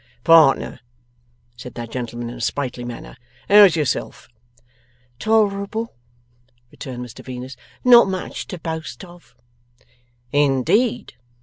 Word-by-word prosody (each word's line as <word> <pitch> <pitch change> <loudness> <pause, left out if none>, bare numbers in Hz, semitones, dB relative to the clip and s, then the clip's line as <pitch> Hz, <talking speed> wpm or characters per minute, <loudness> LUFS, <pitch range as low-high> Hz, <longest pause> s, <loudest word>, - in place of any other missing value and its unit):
'Partner,' 165 -4 +4 0.8
said 125 +1 -11
that 120 -1 -7
gentleman 120 -1 -5
in - - -9
a - - -9
sprightly 125 0 -3
manner, 115 - -8 0.3
'how's 200 -3 +7
yourself?' 150 -5 -3 0.9
'Tolerable,' 220 +1 0 0.8
returned 125 -2 -7
Mr 120 - -12
Venus. 130 +1 -8 0.3
'Not 240 -3 +7
much 185 -1 -5
to 185 - -7
boast 160 +3 -6
of.' 175 -1 -18 1.0
'In 140 -3 +2
deed! 235 - 0
150 Hz, 110 wpm, -21 LUFS, 125-200 Hz, 1.0 s, how's